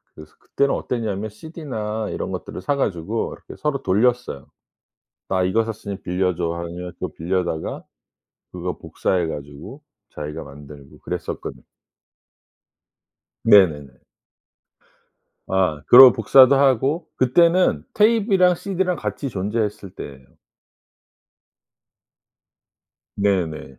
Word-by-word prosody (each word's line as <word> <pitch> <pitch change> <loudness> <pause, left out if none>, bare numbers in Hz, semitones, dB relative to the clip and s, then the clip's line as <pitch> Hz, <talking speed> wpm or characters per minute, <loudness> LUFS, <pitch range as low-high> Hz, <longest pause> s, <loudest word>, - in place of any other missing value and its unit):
그 75 - -11
그때는 140 0 0
어땠냐면 110 -3 -3
CD나 110 -5 -5
이런 - - -4
것들을 - - -6
사 145 - 0
가지고 105 -3 -2
이렇게 - - -13
서로 150 -2 -1
돌렸어요. 115 - 0 0.8
"나 95 -1 +1
이거 100 +5 +1
샀으니 105 -3 -6
빌려줘." 90 -2 -1
하면 85 +1 -6
그거 - - -5
빌려다가 85 -1 -3 0.7
그거 - - -5
복사해 90 -3 -1
가지고 75 - -9 0.3
자기가 75 0 -6
만들고 70 0 -13
그랬었거든. - - -6 1.8
네네네. 75 - +4 1.5
아 90 -6 0
그러고 125 0 +10
복사도 130 +4 +6
하고 135 +4 +2
그때는 165 - +3
tape이랑 205 -5 +3
CD랑 190 -1 -2
같이 140 -3 -4
존재했을 105 0 -3
때에요. 70 -7 -9 3.0
네네. 85 -9 -1
105 Hz, 250 characters per minute, -21 LUFS, 85-135 Hz, 3.0 s, 그러고